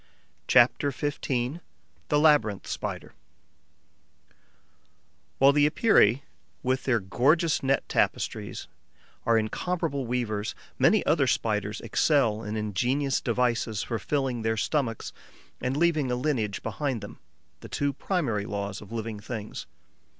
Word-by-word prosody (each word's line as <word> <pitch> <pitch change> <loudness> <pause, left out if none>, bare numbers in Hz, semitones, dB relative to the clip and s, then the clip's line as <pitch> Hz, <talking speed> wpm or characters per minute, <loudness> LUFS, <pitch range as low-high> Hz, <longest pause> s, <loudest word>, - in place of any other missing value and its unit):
CHAPTER 125 +4 +4
XV: 145 +2 -3 0.9
THE 150 - +2
LABYRINTH 145 -10 +3
SPIDER - - -5 2.2
While 135 +1 +6
the 145 0 +4
Epeirae, 140 - +4 0.4
with 130 +1 0
their 120 -4 +2
gorgeous 145 - +2
net 135 0 +1
tapestries, - - -1 0.6
are 115 -1 +5
incomparable 140 +4 -2
weavers, 110 -4 -2 0.2
many - - +4
other - - +3
Spiders - - -1
excel 120 -8 +2
in 110 0 -4
ingenious 125 +7 0
devices 115 -3 0
for 115 -2 -3
filling 135 -5 -1
their 110 0 0
stomachs 115 -1 -1 0.5
and 130 +2 -1
leaving 155 -5 +2
a 125 - +1
lineage 125 -7 -1
behind 125 +1 -2
them: 100 - -10 0.4
the - - -11
two 145 0 -1
primary 125 - -1
laws 100 -1 -4
of 105 - -12
living 110 -2 -4
things. 105 0 -6
125 Hz, 120 wpm, -27 LUFS, 110-145 Hz, 2.2 s, While